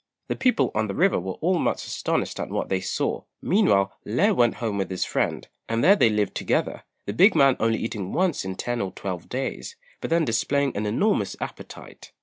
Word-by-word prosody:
The - - 0
people 245 - +2
on 110 0 0
the 100 - -4
river 190 - +3
were 95 +1 -5
all 175 +2 +2
much - - -1
astonished - - -2
at - - -4
what - - -3
they 95 -1 0
saw; 95 - -2 0.2
meanwhile 100 - +2
Lê 190 - +2
went 120 -5 +3
home 110 -4 -3
with 95 - -2
his 95 -1 -2
friend, - - -2 0.2
and 115 +1 0
there 200 - +7
they 120 - +4
lived 105 -1 0
together, - - -1 0.2
the 100 - -3
big 195 - +5
man 135 -2 +5
only 115 0 +2
eating 105 -4 -4
once 180 -3 0
in 95 0 -5
ten 120 +4 -2
or 95 -1 -3
twelve 90 -4 -6
days, 135 - -4 0.2
but - - -5
then 165 -1 +2
displaying 140 +4 0
an 105 +1 -2
enormous 200 - +1
appetite. - - -9
115 Hz, 205 wpm, -24 LUFS, 100-165 Hz, 0.2 s, there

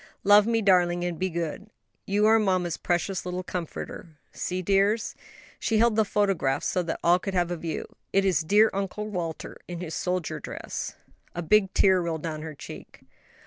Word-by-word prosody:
"Love 205 +1 +6
me, 225 -1 +1
darling, 175 -2 +3
and 175 -2 -3
be 185 0 0
good; 170 +4 -4 0.4
you 205 +2 +2
are 225 +1 +6
mamma's 185 -5 +1
precious 175 +2 -1
little 180 0 -4
comforter. 170 -2 -6
See 185 0 -3
dears," 200 +4 +2
and - - -26 0.4
she 225 - +1
held 230 0 +4
the 220 - +4
photograph 195 -10 0
so 180 - 0
that 170 -2 -3
all 175 +1 +5
could 195 +1 -4
have 175 -1 +1
a - - 0
view, 165 0 -4 0.3
"it 195 0 +3
is 180 -5 +3
dear 210 +7 +4
Uncle 200 +2 -3
Walter 175 -6 -5
in 175 -1 -6
his 170 -3 -5
soldier 180 -1 -2
dress." - - -6 0.4
A 175 - -3
big 195 +3 +3
tear 190 -2 +5
rolled 165 -3 -3
down 155 -2 -4
her 155 -1 -7
cheek. - - -11
185 Hz, 185 wpm, -26 LUFS, 170-200 Hz, 0.4 s, Love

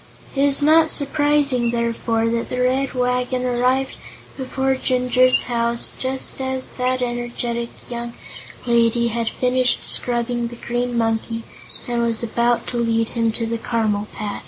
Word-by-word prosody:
It 275 - +1
is 285 0 +2
not 315 +2 +5
surprising, 290 -4 +2
therefore, 230 -1 0
that 230 0 -2
the 250 - -3
Red 260 +2 +1
Wagon 250 0 0
arrived 255 +2 +1 0.4
before 265 0 -1
Jinjur's 255 0 +3
house 235 -1 -1
just 265 +1 -3
as 260 0 -2
that 255 0 -1
energetic 240 -1 -3 0.2
young 235 -1 -5 0.5
lady 235 0 +3
had 230 0 -1
finished 255 0 +1
scrubbing 240 0 +1
the 240 - -9
Green 240 +1 -2
Monkey 225 0 -1 0.4
and 240 -1 0
was 230 -1 0
about 235 +1 +1
to 245 - -3
lead 230 -1 +1
him 230 -1 0
to 230 - +1
the 230 0 -3
caramel 215 -3 -1
patch. 205 -1 -5
240 Hz, 145 wpm, -21 LUFS, 235-255 Hz, 0.5 s, not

